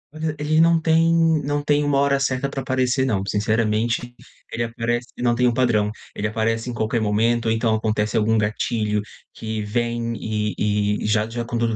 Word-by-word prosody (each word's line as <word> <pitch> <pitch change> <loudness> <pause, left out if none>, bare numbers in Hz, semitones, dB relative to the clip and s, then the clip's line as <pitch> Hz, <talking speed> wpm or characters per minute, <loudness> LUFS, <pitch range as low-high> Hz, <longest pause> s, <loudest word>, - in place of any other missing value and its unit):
Olha, 155 0 -3
ele 155 +2 +2
não 165 0 +4
tem 165 +1 +3 0.3
não 145 +1 -1
tem 145 0 +2
uma 145 -1 +1
hora 140 0 +2
certa 135 0 0
pra 135 0 -4
aparecer 130 0 0
não. 105 -7 0
Sinceramente, 110 +3 0 0.4
ele 115 - -3
aparece 120 +1 -2
não 120 -1 +1
tem 125 +1 +2
um 120 - +2
padrão. 115 -5 +2 0.3
Ele 105 - -1
aparece 115 +2 -1
em 120 - -4
qualquer 110 +1 -1
momento, 115 +3 +1
ou - - +2
então 115 0 +1
acontece 110 -1 -1
algum 110 +1 +2
gatilho 105 0 0 0.3
que 110 -1 -4
vem 115 +2 -2
e 105 -1 -1
e - - -3
já 105 0 +1
já 120 +1 -4
com 120 0 -4
todo 115 -1 0
115 Hz, 190 wpm, -22 LUFS, 110-130 Hz, 0.4 s, não